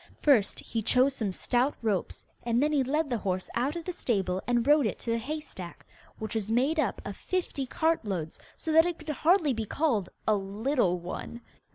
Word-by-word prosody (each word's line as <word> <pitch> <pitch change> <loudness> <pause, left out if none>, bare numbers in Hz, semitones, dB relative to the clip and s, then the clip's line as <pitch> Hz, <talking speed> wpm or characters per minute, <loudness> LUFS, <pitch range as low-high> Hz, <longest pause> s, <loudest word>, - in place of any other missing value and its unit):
First 250 -9 +3
he 225 - -3
chose 255 +5 +3
some 215 -7 -2
stout 245 +8 +1
ropes, 205 -5 -1 0.2
and 235 0 +1
then 300 - +2
he 285 -3 +3
led 300 +4 0
the 240 - 0
horse 185 -2 -2
out 265 +6 0
of 340 -1 -5
the 360 - -3
stable 190 - -1
and 240 -1 +2
rode 290 -4 +5
it - - -3
to 230 - -3
the 230 - +1
hay 300 +7 -3
stack, 180 - -10 0.3
which 220 0 -5
was 220 -1 -2
made 270 +7 +2
up - - 0
of - - -5
fifty 345 -7 -2
cartloads, 205 - -1 0.2
so 320 - -3
that 325 +2 +6
it 345 -1 -3
could 310 -1 -10
hardly 310 0 +3
be 225 -1 -3
called 235 - 0 0.2
'a 215 - +5
little 200 0 0
one. 180 +7 -6
245 Hz, 205 wpm, -29 LUFS, 210-300 Hz, 0.3 s, that